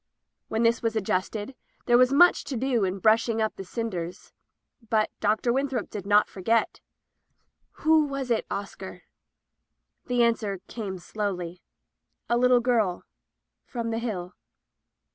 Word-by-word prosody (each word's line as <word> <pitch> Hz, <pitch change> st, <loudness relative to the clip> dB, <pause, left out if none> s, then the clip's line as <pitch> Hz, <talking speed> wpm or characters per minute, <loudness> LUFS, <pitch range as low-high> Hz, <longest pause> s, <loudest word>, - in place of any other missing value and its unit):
When 220 Hz, +1 st, -1 dB
this 230 Hz, 0 st, +3 dB
was 225 Hz, -1 st, -1 dB
adjusted, 205 Hz, +3 st, -2 dB, 0.3 s
there 240 Hz, -, +4 dB
was 250 Hz, +1 st, +5 dB
much 350 Hz, +6 st, +5 dB
to 265 Hz, -, -4 dB
do 245 Hz, -3 st, +1 dB
in 185 Hz, +1 st, -2 dB
brushing 225 Hz, +3 st, +3 dB
up 220 Hz, -1 st, 0 dB
die -, -, -7 dB
cin 225 Hz, +4 st, -4 dB
ders. 175 Hz, 0 st, -6 dB, 0.6 s
But 215 Hz, -1 st, +2 dB
Dr. 215 Hz, +3 st, +1 dB
Winthrop 265 Hz, -4 st, -2 dB
did 200 Hz, -2 st, -6 dB
not 205 Hz, +1 st, +5 dB
forget. 225 Hz, +4 st, 0 dB, 1.1 s
"Who 315 Hz, -1 st, +5 dB
was 275 Hz, -3 st, -4 dB
it, 225 Hz, -, 0 dB
Oscar?" 190 Hz, -2 st, -6 dB, 1.0 s
The 245 Hz, -2 st, +2 dB
answer 220 Hz, -4 st, 0 dB
came 200 Hz, -5 st, -5 dB
slowly 180 Hz, -2 st, -4 dB, 0.3 s
— -, -, -51 dB
"A -, -, +4 dB
little 250 Hz, 0 st, +4 dB
girl— 225 Hz, -7 st, +1 dB, 0.6 s
from 230 Hz, -2 st, -4 dB
the 225 Hz, -, -1 dB
Hill." 190 Hz, -6 st, -4 dB
225 Hz, 145 wpm, -26 LUFS, 200-240 Hz, 1.1 s, was